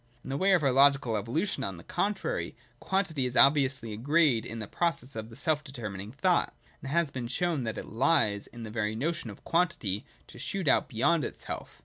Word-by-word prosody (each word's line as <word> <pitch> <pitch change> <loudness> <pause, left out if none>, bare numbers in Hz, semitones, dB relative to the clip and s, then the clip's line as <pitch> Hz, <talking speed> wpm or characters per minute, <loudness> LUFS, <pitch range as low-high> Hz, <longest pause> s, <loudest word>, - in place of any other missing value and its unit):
In 135 - -6
the 135 - -1
way 195 +5 +3
of 175 -5 +3
our 135 - +3
logical 135 -3 +4
evolution, 135 - -1
on 95 -6 -4
the 85 - -12
contrary, 210 - -2 0.2
quantity 165 -9 0
is 125 - -3
obviously 135 -5 +4
a - - -6
grade 145 -1 +2
in 115 - -6
the 110 - -4
process 140 - -1
of 110 +1 -7
self 155 +1 0
determining 110 -7 -6
thought; 170 +7 +1 0.3
and 135 - -6
it 140 - -2
has 170 -4 +2
been 125 -3 -4
shown 150 +1 -1
that 110 - -3
it - - -5
lies 110 -4 +1
in 120 -1 -10
the 110 - -7
very 110 -1 -1
notion 145 0 -2
of 100 - -11
quantity 165 - 0 0.2
to - - -13
shoot 195 -5 -3
out 130 - +3
beyond 145 +6 +2
itself. - - -7
135 Hz, 210 wpm, -29 LUFS, 115-165 Hz, 0.3 s, logical